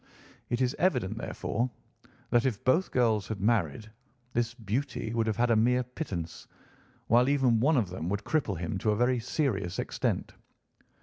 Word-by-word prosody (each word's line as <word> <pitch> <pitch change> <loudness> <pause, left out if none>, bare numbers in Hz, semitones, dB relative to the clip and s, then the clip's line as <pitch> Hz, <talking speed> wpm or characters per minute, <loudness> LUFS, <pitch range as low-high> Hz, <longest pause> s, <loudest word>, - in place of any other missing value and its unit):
It 120 +1 0
is 130 +1 +1
evident, 125 - +1
therefore, 120 +4 -2 0.6
that 120 0 +4
if 110 -5 -3
both 160 +9 +3
girls 110 -5 +2
had 110 -3 -4
married, 105 -2 +1 0.5
this 120 0 0
beauty 115 +1 -3
would 115 -1 +1
have 110 -2 0
had 120 0 +2
a - - +5
mere 125 +3 +3
pittance, 100 - -6 0.6
while 120 +3 +4
even 130 -5 +3
one 145 +5 +3
of 105 -7 0
them 90 -2 -4
would 100 +3 -2
cripple 135 - 0
him 85 +3 -3
to 110 - 0
a 105 - +3
very 125 +1 +2
serious 115 - -1
extent. - - -2
115 Hz, 170 wpm, -29 LUFS, 105-125 Hz, 0.6 s, a